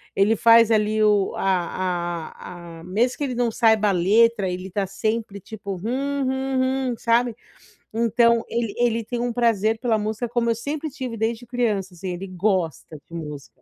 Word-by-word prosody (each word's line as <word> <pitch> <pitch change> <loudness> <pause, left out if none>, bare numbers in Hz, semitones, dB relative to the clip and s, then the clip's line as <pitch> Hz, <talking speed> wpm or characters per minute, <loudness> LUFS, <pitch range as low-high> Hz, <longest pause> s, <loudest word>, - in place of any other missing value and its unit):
ele 205 +3 +3
faz 230 0 +6
ali 215 0 +2
o 205 -2 +3
a 175 -2 -1
a 170 -2 -11
a - - -12
mesmo 225 +7 0
que - - -1
ele 255 -3 -3
não 240 -1 +1
saiba 220 -2 +3
a - - +3
letra, 200 +3 +3
ele 185 +1 -5
tá 195 +1 -1
sempre, 215 +1 -3
tipo, 200 -1 -7
hum, 270 +9 -2
hum, 265 0 0
hum, - - -3
sabe. 235 0 +1 0.6
Então 235 +1 +3
ele 235 -3 -2
ele 230 -1 +1
tem 240 +1 -4
um 245 0 -1
prazer 225 -2 +1
pela 230 -3 +1
música 220 +3 -2
como 235 0 0
eu 230 - +2
sempre 290 +6 -4
tive 260 -5 -6
desde 225 +2 -2
criança, 220 -6 -1
assim, 185 +2 -6
ele 180 +2 -5
gosta 185 -4 -1
de - - -15
música. 150 -5 -8
220 Hz, 180 wpm, -23 LUFS, 190-240 Hz, 0.6 s, faz